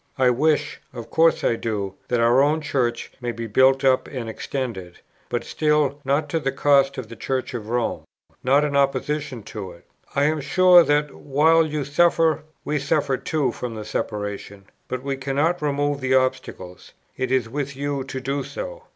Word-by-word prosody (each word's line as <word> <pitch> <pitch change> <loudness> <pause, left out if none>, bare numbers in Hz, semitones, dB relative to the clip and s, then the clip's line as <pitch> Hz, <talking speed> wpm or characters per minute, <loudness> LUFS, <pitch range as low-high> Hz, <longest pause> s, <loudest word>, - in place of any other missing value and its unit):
I 130 -1 +4
wish, 150 +5 0
of 120 -3 -9
course 165 0 +3
I 115 - +2
do, 105 -4 -3
that 120 - 0
our 120 +3 +4
own 150 +3 +2
Church 125 -6 -2
may 120 -1 -2
be 115 0 -6
built 130 +5 +3
up 130 -1 +3
and 125 -4 -6
extended, 110 -6 -5 0.3
but 120 -1 -2
still, 150 -2 0
not 145 +3 0
at 165 -2 0
the 135 - 0
cost 140 0 +3
of 130 -4 -5
the 115 - -10
Church 130 +2 -3
of 110 -3 -6
Rome, 120 0 -1 0.4
not 140 +3 +4
in 145 -1 -2
opposition 140 -2 0
to 95 -4 -7
it. 85 - -19 0.3
I 140 - +2
am 155 +1 +1
sure, 180 +4 +6
that, 145 -2 +1
while 160 +4 +3
you 150 -2 -3
suffer, 160 +1 +3 0.2
we 150 0 0
suffer 140 0 0
too 145 -1 -1
from 120 0 -6
the 110 -1 -6
separation; 105 -2 -5 0.2
but 130 0 -4
we 135 -1 -2
cannot 145 +6 0
remove 145 -1 -1
the 130 0 +2
obstacles; 95 -8 -2 0.2
it 130 -1 -2
is 130 -3 +2
with 140 +3 -4
you 140 0 -2
to 135 -1 -5
do 135 +2 -2
so. - - -7
135 Hz, 185 wpm, -23 LUFS, 120-150 Hz, 0.4 s, sure